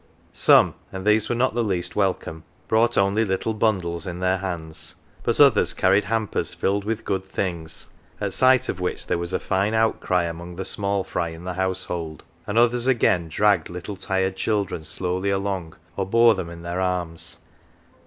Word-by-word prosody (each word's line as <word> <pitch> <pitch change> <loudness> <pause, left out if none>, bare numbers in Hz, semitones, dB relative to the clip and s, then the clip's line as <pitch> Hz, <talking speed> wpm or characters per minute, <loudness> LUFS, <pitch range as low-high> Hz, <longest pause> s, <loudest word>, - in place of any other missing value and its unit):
Some - - +5 0.2
and 95 0 -6
these 105 0 +3
were 120 - +1
not 125 +1 +1
the 120 0 0
least 95 -5 -1
welcome 90 -5 -1 0.2
brought 115 +2 +2
only 100 +3 +3
little 100 +2 -1
bundles 95 -7 -1
in 90 -1 -5
their 95 +1 +1
hands; 80 -4 -4 0.3
but - - -1
others - - +5
carried 95 +2 +3
hampers 110 0 -1
filled 100 +1 0
with 110 0 -3
good 95 -1 -1
things 85 -4 -4 0.3
(at - - -2
sight 130 -1 +4
of 95 - -3
which 90 0 -2
there - - -1
was 85 +1 -4
a - - 0
fine 100 +3 0
outcry 110 -5 +1
among 85 +1 -6
the 95 +1 -5
small 100 -1 0
fry 85 - -2
in 80 +1 -10
the 90 0 -4
household); 90 -4 -3 0.2
and 105 - -2
others, 120 +1 +3
again, 110 -9 +2
dragged 100 +1 +2
little 90 +3 -6
tired 95 0 -1
children 100 -6 -1
slowly 90 +4 -2
along, 95 -4 -2 0.2
or 95 -1 -2
bore 115 +2 +5
them 95 -4 -5
in 85 0 -10
their 85 +1 -3
arms. 90 -3 -3
95 Hz, 180 wpm, -23 LUFS, 85-105 Hz, 0.3 s, Some